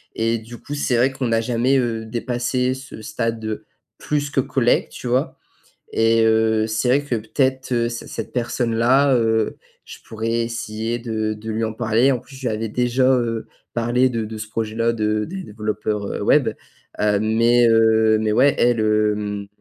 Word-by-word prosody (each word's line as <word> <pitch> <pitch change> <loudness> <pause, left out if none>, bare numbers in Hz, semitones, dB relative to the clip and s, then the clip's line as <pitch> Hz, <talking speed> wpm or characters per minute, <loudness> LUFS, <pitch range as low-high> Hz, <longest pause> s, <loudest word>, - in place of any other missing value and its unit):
et 115 +1 0
du 115 +2 -11
coup, 145 - -8
c'est 130 -4 0
vrai 130 +3 +3
qu'on 135 -2 -2
n'a 115 - +2
jamais, 125 +3 +1
heu, 115 -3 -1
dépassé 125 +2 -1
ce 130 -3 -10
stade, 115 +1 -3
heu, 110 -1 -4 0.3
plus 145 -1 -1
que 135 - +2
collègue, 125 -2 +1
tu 125 - -8
vois? 125 +2 0 0.6
Et 115 0 +3
heu, 110 0 +2
c'est 110 +2 -1
vrai 135 +3 +4
que, 140 -4 -2
peut-être, 130 +4 -1
heu, 120 0 +1
c 120 0 -7
cette - - -6
personne-là, 120 +3 +2
heu, 110 -2 +1 0.3
je - - -10
pourrais 115 +1 -3
essayer 115 0 -3
de 110 -2 -2
de 110 +1 -7
lui 110 +1 -2
en 110 - -4
parler, 120 +4 +2
en 125 - -2
plus, 135 - -15
je - - -13
lui - - +2
avais 110 0 -3
déjà, 125 +2 +1
heu, 115 -3 -1 0.3
parlé 120 +2 +2
de 115 -2 -2
de 110 0 -7
ce 110 0 -6
projet-là, 115 +1 -1
de 105 -1 0
des 190 +1 -6
développeurs, 105 -2 -3
heu, - - -4
web, - - +4 0.5
heu, 105 -1 +2
mais 115 +2 +3
heu, 110 -1 +4
mais 110 -1 0
ouais, 135 +4 +4
elle, 120 -2 +3
hem, 105 -1 0
115 Hz, 185 wpm, -21 LUFS, 110-125 Hz, 0.6 s, vrai